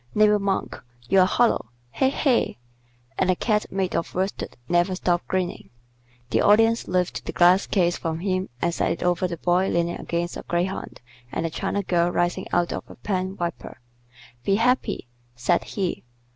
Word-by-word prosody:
Neighbor 210 0 +5
Monk, 195 -1 -2 0.3
you're 190 -1 +6
hollow. 230 - +2 0.2
He! 265 - +2
he!" 270 - +1 0.6
and 185 - +2
the 185 - +4
Cat 210 +2 0
made 190 -1 -1
of - - -2
worsted 190 +2 -3
never 175 +2 +2
stopped 175 -1 0
grinning. 185 -1 -2 0.6
The - - +3
Audience 225 +2 +4
lifted 180 0 -1
the - - -3
glass 180 +2 +4
case 175 -3 +2
from 160 -1 -2
him 185 -1 -1
and 170 0 +1
set - - 0
it - - -6
over 180 +1 +1
the 170 -1 -5
Boy 180 +3 +2
leaning 170 0 0
against 170 0 -3
a - - -6
greyhound 175 +2 -2 0.3
and 165 - -2
the 165 - -2
China 200 +5 -2
girl 175 -1 +2
rising 175 +2 0
out 175 0 +1
of - - -6
a - - -11
pen 190 -1 -3
wiper. 170 -1 -5 0.6
"Be 195 - +2
happy!" 245 - +1 0.3
said 125 +9 +1
he. 190 -4 -3
185 Hz, 170 wpm, -24 LUFS, 175-195 Hz, 0.6 s, you're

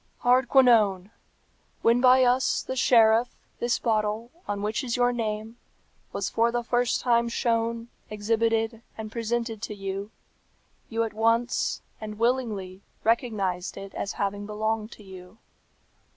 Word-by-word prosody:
"Hardquanonne! 240 -6 +4 0.7
when 235 +2 +4
by 255 0 +6
us, 250 +1 +2
the 260 - -5
sheriff, 230 -1 +4 0.2
this 240 0 +1
bottle, 220 +1 -1 0.2
on 205 0 -3
which 215 +6 -1
is 240 -3 -2
your 245 0 +3
name, 220 0 -4 0.5
was 195 - -2
for 230 +1 +1
the 240 0 -1
first 240 0 +1
time 235 -1 +2
shown, 230 0 -1 0.2
exhibited, 225 +1 0 0.2
and 215 -1 -6
presented 230 -1 -2
to 215 -2 -5
you, 195 +1 -5 0.8
you 230 0 0
at 225 - -4
once, 230 +2 +1 0.2
and 215 -1 -6
willingly, 220 -6 -1 0.2
recognized 210 -6 0
it 195 0 -8
as 200 - -4
having 205 0 -3
belonged 215 +1 -2
to 210 - -15
you. 185 +1 -12
225 Hz, 135 wpm, -26 LUFS, 210-240 Hz, 0.8 s, by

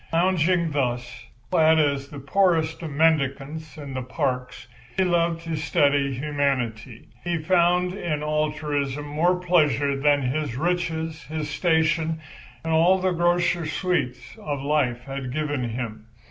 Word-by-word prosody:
Lounging 170 -1 +2
thus, 125 -3 -2 0.3
clad 160 0 +5
as 140 -3 +1
the 145 - -9
poorest 160 +2 +1
of 165 - -4
mendicants 150 0 0
in 140 -3 -7
the 130 - -3
parks, 125 -2 -3 0.3
he 190 - +4
loved 170 -2 +1
to 165 -1 -4
study 145 -2 +2
humanity. 130 -5 -2
He 175 0 -1
found 180 +2 +2
in 160 -6 -3
altruism 150 -2 -1
more 160 +5 +2
pleasure 150 -6 +2
than 145 0 +2
his 130 0 -2
riches, 165 0 -1
his 155 -1 -4
station 160 0 +1 0.4
and 165 0 -1
all 170 +4 +5
the 185 0 0
grosser 175 -1 +1
sweets 170 -5 -2
of 145 -3 -4
life 130 -5 0
had 135 -1 -5
given 145 -4 -2
him. 110 -2 -5
150 Hz, 135 wpm, -24 LUFS, 140-165 Hz, 0.4 s, clad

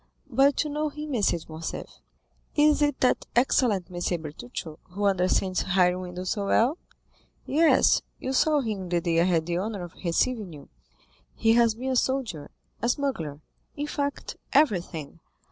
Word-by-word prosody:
But 275 +5 +4
you 300 - -5
know 300 +1 -1
him, 300 0 -6
M. 235 - 0
de 175 -3 +2
Morcerf." 160 +1 -7 0.6
"Is 300 0 +4
it 290 -2 +1
that 255 - +2
excellent 235 -6 +2
M. 175 0 -2
Bertuccio, 150 +2 -7
who 200 +3 -3
understands 185 -1 +1
hiring 180 -1 +2
windows 180 0 -5
so 200 -2 -2
well?" 250 - +2 0.7
"Yes, 300 -2 +4 0.2
you 260 - -3
saw 300 +2 +3
him 205 -7 -4
the 175 0 +2
day 165 -1 +1
I - - +3
had 170 -3 +1
the 170 0 -1
honor 200 0 -3
of 175 - -9
receiving 195 +2 0
you; 145 - -12 0.7
he 225 0 +3
has 230 -2 +4
been 260 +3 -3
a - - 0
soldier, 245 - -1 0.3
a 235 - +1
smuggler—in 245 - -4
fact, 285 -1 -3 0.2
everything. 175 - +1
205 Hz, 160 wpm, -26 LUFS, 175-270 Hz, 0.7 s, But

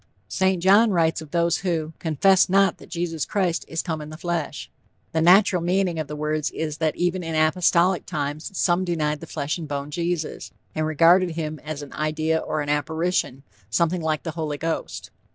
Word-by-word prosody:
St. 190 -2 +1
John 205 +4 +6
writes 165 -4 +1
of 155 - -10
those 170 +1 +1
who 165 -4 -2
"confessed 180 +5 +3
not 195 -1 +3
that - - -14
Jesus 170 -3 -2
Christ 185 -5 0
is 165 - -3
come 160 -3 -3
in 150 - -8
the 155 - -9
flesh." 170 -2 -4 0.4
The 160 - 0
natural 180 +1 +5
meaning 180 -1 0
of 155 - -3
the 150 - -6
words 150 0 -1
is 155 -1 -4
that 155 -2 0
even 180 +1 0
in 165 -2 -4
apostolic 170 +3 +2
times 150 -1 -3
some 175 0 +2
denied 155 -4 -1
the - - -10
flesh 150 +2 -3
and 160 - -6
bone 145 0 -4
Jesus, 170 0 -3 0.2
and 155 0 -1
regarded 170 +4 +5
him 155 -2 -4
as 150 -1 -5
an 140 - -11
idea 155 +1 0
or 155 - -2
an 145 - -4
apparition 160 -2 -1 0.3
something 170 +10 +1
like 155 -1 -1
the 165 - -3
Holy 155 -2 -3
Ghost. 165 +2 -4
160 Hz, 190 wpm, -24 LUFS, 155-175 Hz, 0.4 s, John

